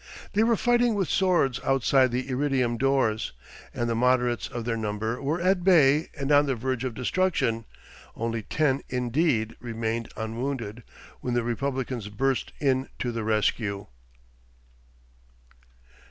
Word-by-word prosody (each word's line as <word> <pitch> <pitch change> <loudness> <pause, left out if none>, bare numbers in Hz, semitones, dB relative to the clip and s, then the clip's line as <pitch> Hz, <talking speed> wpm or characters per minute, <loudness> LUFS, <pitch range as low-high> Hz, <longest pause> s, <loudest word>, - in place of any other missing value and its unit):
They 210 - +3
were 230 +1 +4
fighting 240 -2 +3
with 195 -4 0
swords 175 -9 +2
outside 135 0 +3
the 125 +2 -2
iridium 130 -2 0
doors, 130 -4 +1 0.4
and 120 - -2
the 115 - 0
moderates 125 0 +2
of 120 -2 -6
their 120 -1 0
number 110 +2 -3
were 150 +5 -1
at 185 0 +2
bay 155 -4 +5
and 140 0 -2
on 145 0 +5
the 135 - 0
verge 130 +1 -2
of 125 -3 -3
destruction, 125 -5 0 0.5
only 115 0 -2
ten, 140 +4 0
indeed, 125 -2 0
remained 115 -1 -3
unwounded, 115 0 -4 0.4
when 125 -1 -2
the 120 - +1
republicans 125 -2 -3
burst 130 +4 -1
in 135 -2 +1
to 120 - -2
the 115 -1 -3
rescue.... 105 -2 0
125 Hz, 140 wpm, -26 LUFS, 115-140 Hz, 0.5 s, bay